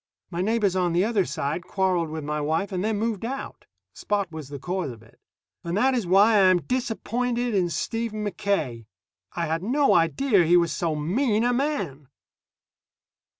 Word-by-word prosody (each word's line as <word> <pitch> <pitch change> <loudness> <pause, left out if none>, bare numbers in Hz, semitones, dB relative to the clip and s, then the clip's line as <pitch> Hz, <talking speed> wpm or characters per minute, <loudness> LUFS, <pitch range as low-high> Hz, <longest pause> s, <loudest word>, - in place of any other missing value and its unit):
My 170 0 -2
neighbors 210 -2 +1
on 180 -2 +1
the 175 +2 +3
other 215 -4 +1
side 150 +3 -3
quarreled 185 -4 0
with 155 0 -5
my 150 +1 -2
wife 160 +7 -1
and 185 -1 -2
then 215 0 0
moved 220 -1 -2
out. 265 +4 -6 0.3
Spot 200 -4 -2
was 155 -4 -8
the 145 - -6
cause 180 +2 -3
of 115 -2 -10
it. 110 - -22 0.4
And 170 +2 -2
that 260 +4 +3
is 235 -8 -1
why 205 +4 +5
I 190 -2 +6
am 180 -2 +3
disappointed 245 -1 -1
in 185 -3 +1
Stephen 215 +5 -3
Mackaye. 175 - -2 0.5
I 170 - -1
had 160 +1 -1
no 275 +8 +2
idea 190 +5 +3
he 170 +2 +5
was 170 -1 +2
so 165 -3 -1
mean 210 - +1
a 245 +1 +2
man. 200 - -2
190 Hz, 180 wpm, -25 LUFS, 165-225 Hz, 0.5 s, I